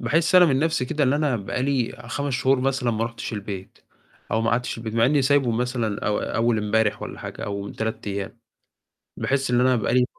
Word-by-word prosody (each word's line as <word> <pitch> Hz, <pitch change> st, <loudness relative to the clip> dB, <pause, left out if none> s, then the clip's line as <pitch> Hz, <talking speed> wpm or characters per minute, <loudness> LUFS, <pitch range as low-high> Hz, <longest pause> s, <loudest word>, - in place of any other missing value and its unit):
باحس 160 Hz, +9 st, +1 dB
أنا 180 Hz, -1 st, +9 dB
من 135 Hz, -6 st, +3 dB
نفسي 155 Hz, -3 st, +1 dB
كده 145 Hz, +3 st, 0 dB
اللي 135 Hz, +2 st, +2 dB
أنا 150 Hz, -5 st, +1 dB
بقى 110 Hz, +4 st, -3 dB
لي 130 Hz, -3 st, 0 dB, 0.2 s
5 140 Hz, +3 st, -2 dB
شهور 130 Hz, 0 st, +2 dB
مثلًا 130 Hz, -2 st, 0 dB
ما 115 Hz, 0 st, 0 dB
رُحتش 115 Hz, +1 st, -6 dB
البيت، 100 Hz, -3 st, -6 dB, 0.5 s
أو 110 Hz, -, +2 dB
ما 115 Hz, +1 st, +1 dB
قعدتش 120 Hz, +2 st, 0 dB
في -, -, -7 dB
البيت، 115 Hz, -1 st, -5 dB
مع 115 Hz, 0 st, +4 dB
إني 145 Hz, +1 st, +3 dB
سايبه 135 Hz, -2 st, +3 dB
مثلًا 115 Hz, -3 st, -1 dB
أو 105 Hz, -, +1 dB
أول 115 Hz, -1 st, 0 dB
إمبارح 105 Hz, 0 st, +1 dB
والّا -, -, -7 dB
حاجة -, -, -6 dB
أو 100 Hz, -1 st, -4 dB
من 100 Hz, -, -7 dB
3 110 Hz, -1 st, -3 dB
أيام. 100 Hz, +3 st, -4 dB, 0.8 s
باحس 135 Hz, -1 st, 0 dB
اللي 120 Hz, 0 st, +3 dB
أنا 130 Hz, 0 st, +4 dB
بقى 115 Hz, 0 st, 0 dB
لي 125 Hz, 0 st, +4 dB
120 Hz, 225 wpm, -24 LUFS, 110-135 Hz, 0.8 s, أنا